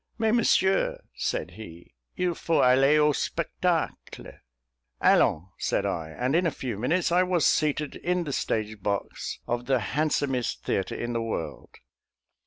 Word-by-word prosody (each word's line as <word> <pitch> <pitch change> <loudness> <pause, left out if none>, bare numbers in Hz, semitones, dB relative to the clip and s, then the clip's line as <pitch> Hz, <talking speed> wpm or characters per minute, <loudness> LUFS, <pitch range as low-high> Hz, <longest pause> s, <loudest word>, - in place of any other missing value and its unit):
"Mais, 220 -1 +1
monsieur," 195 -5 +2
said - - -2
he, 85 -9 -12 0.2
"il 180 -1 +1
faut 165 0 +1
aller 135 +4 +5
au 150 0 +4
spectacle?" - - -2 0.7
"Allons," 85 +5 +3
said - - 0
I, 80 -1 -2
and 125 - -1
in 175 +1 +3
a - - +3
few 125 -7 -5
minutes 170 +10 +1
I 180 +1 +4
was 180 -3 +1
seated 150 -1 +1
in 180 +1 -1
the 145 -4 -4
stage 110 -3 -2
box 100 0 -3
of 120 0 -2
the 135 -1 +3 0.2
handsomest 140 -4 0
theatre 95 - -1
in 120 0 -3
the 115 - -1
world. 110 -7 -5
135 Hz, 150 wpm, -27 LUFS, 110-170 Hz, 0.7 s, aller